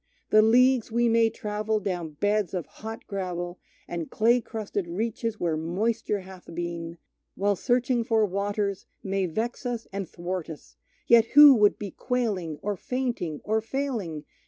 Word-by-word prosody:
The 215 Hz, -, +7 dB
leagues 245 Hz, +2 st, +4 dB
we 235 Hz, +1 st, +2 dB
may 230 Hz, 0 st, +4 dB
travel 215 Hz, 0 st, -2 dB
down 175 Hz, -6 st, -3 dB
beds 205 Hz, +2 st, 0 dB
of 175 Hz, -, -2 dB
hot 220 Hz, +1 st, -9 dB
gravel, 180 Hz, -2 st, -4 dB, 0.3 s
And 170 Hz, -2 st, -4 dB
clay 235 Hz, +3 st, +3 dB
crusted 210 Hz, -4 st, -4 dB
reaches 220 Hz, +4 st, -3 dB
where 165 Hz, -2 st, 0 dB
moisture 205 Hz, +6 st, -1 dB
hath 185 Hz, -1 st, -13 dB
been, 170 Hz, -1 st, -4 dB, 0.4 s
While 200 Hz, +1 st, +1 dB
searching 245 Hz, +3 st, +1 dB
for 225 Hz, -2 st, +2 dB
waters, 200 Hz, 0 st, -2 dB, 0.2 s
may 195 Hz, -1 st, 0 dB
vex 225 Hz, -, -3 dB
us 240 Hz, -2 st, -3 dB
and 195 Hz, -3 st, -4 dB
thwart 175 Hz, -1 st, -4 dB
us, 160 Hz, -, -11 dB, 0.3 s
Yet 230 Hz, -1 st, +6 dB
who 295 Hz, -1 st, +11 dB
would 210 Hz, -4 st, +4 dB
be 205 Hz, -2 st, -6 dB
quailing, 205 Hz, -, -2 dB
or 205 Hz, 0 st, -1 dB
fainting, 235 Hz, -, -3 dB
or 220 Hz, +1 st, +1 dB
failing? 225 Hz, -, -3 dB
210 Hz, 155 wpm, -26 LUFS, 180-230 Hz, 0.4 s, who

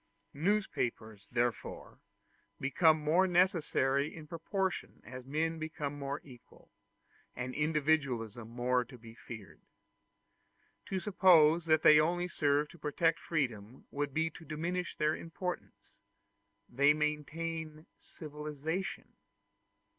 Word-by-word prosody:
Newspapers 125 Hz, -, -1 dB
therefore 120 Hz, -1 st, -2 dB, 0.6 s
become 155 Hz, +3 st, +4 dB
more 165 Hz, +5 st, +3 dB
necessary 160 Hz, -6 st, +2 dB
in 160 Hz, -2 st, -9 dB
proportion 180 Hz, +4 st, -3 dB
as 125 Hz, +3 st, -9 dB
men 160 Hz, +3 st, -1 dB
become 155 Hz, -2 st, -4 dB
more 140 Hz, +1 st, -3 dB
equal, 125 Hz, -4 st, -17 dB, 0.6 s
and 125 Hz, +1 st, -4 dB
individualism 140 Hz, -7 st, 0 dB
more 125 Hz, +1 st, +1 dB
to 125 Hz, +1 st, -13 dB
be 115 Hz, -1 st, -13 dB
feared. 115 Hz, -3 st, -11 dB, 1.3 s
To 190 Hz, -, -1 dB
suppose 170 Hz, -4 st, +5 dB
that 155 Hz, -1 st, +4 dB
they 150 Hz, 0 st, +8 dB
only 175 Hz, +3 st, +1 dB
serve 145 Hz, -3 st, +1 dB
to 170 Hz, -, -15 dB
protect 165 Hz, +3 st, +1 dB
freedom 120 Hz, -7 st, -3 dB
would 145 Hz, 0 st, -2 dB
be 160 Hz, +3 st, 0 dB
to 165 Hz, -, -12 dB
diminish 170 Hz, +3 st, -3 dB
their 155 Hz, +1 st, +2 dB
importance: 180 Hz, +2 st, -7 dB, 0.7 s
they 140 Hz, +4 st, +4 dB
maintain 155 Hz, +1 st, -3 dB
civilization. 150 Hz, +3 st, -5 dB
150 Hz, 110 wpm, -33 LUFS, 135-165 Hz, 1.3 s, they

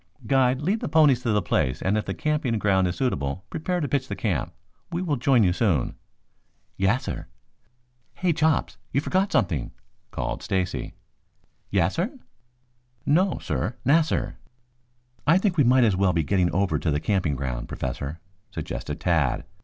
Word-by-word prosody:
"Guide, 130 Hz, -1 st, +3 dB
lead 200 Hz, +8 st, +1 dB
the -, -, -4 dB
ponies 145 Hz, -5 st, +5 dB
to 120 Hz, -, 0 dB
the 105 Hz, -3 st, +2 dB
place, 65 Hz, -6 st, 0 dB
and 95 Hz, +3 st, 0 dB
if 110 Hz, -, -1 dB
the -, -, -3 dB
camping 150 Hz, -7 st, 0 dB
ground 95 Hz, -3 st, +2 dB
is 90 Hz, -, -2 dB
suitable, 90 Hz, -, -2 dB
prepare 180 Hz, +3 st, -1 dB
to 145 Hz, -, -1 dB
pitch 140 Hz, -2 st, -1 dB
the -, -, -4 dB
camp. -, -, -1 dB, 0.4 s
We 175 Hz, +2 st, -2 dB
will 155 Hz, -5 st, 0 dB
join 125 Hz, -2 st, +3 dB
you 90 Hz, -2 st, +3 dB
soon." 90 Hz, -, +1 dB, 0.8 s
"Yassir." 100 Hz, +7 st, -1 dB, 0.9 s
"Hey, 180 Hz, -2 st, +1 dB
Chops, 155 Hz, -1 st, +1 dB
you 135 Hz, -, +2 dB
forgot 190 Hz, +6 st, 0 dB
something," 80 Hz, -9 st, +1 dB, 0.4 s
called -, -, -3 dB
Stacy. 95 Hz, -2 st, -2 dB, 0.8 s
"Yassir?" 135 Hz, -, 0 dB, 0.9 s
"No, 180 Hz, +5 st, +3 dB
sir, 80 Hz, -, -2 dB
'nassir.'" 160 Hz, +3 st, +2 dB, 0.9 s
"I 165 Hz, +4 st, +6 dB
think 190 Hz, -2 st, +1 dB
we 145 Hz, -, +4 dB
might 125 Hz, +1 st, +5 dB
as 105 Hz, -5 st, +3 dB
well 95 Hz, -1 st, +2 dB
be 80 Hz, -1 st, +1 dB
getting 90 Hz, +3 st, +2 dB
over 95 Hz, +1 st, +1 dB
to 80 Hz, -, -1 dB
the 75 Hz, -1 st, +1 dB
camping 90 Hz, -5 st, 0 dB
ground, 65 Hz, -3 st, -4 dB
Professor," 70 Hz, +5 st, -4 dB, 0.3 s
suggested -, -, -5 dB
Tad. 80 Hz, -8 st, +1 dB
110 Hz, 160 wpm, -25 LUFS, -, 0.9 s, I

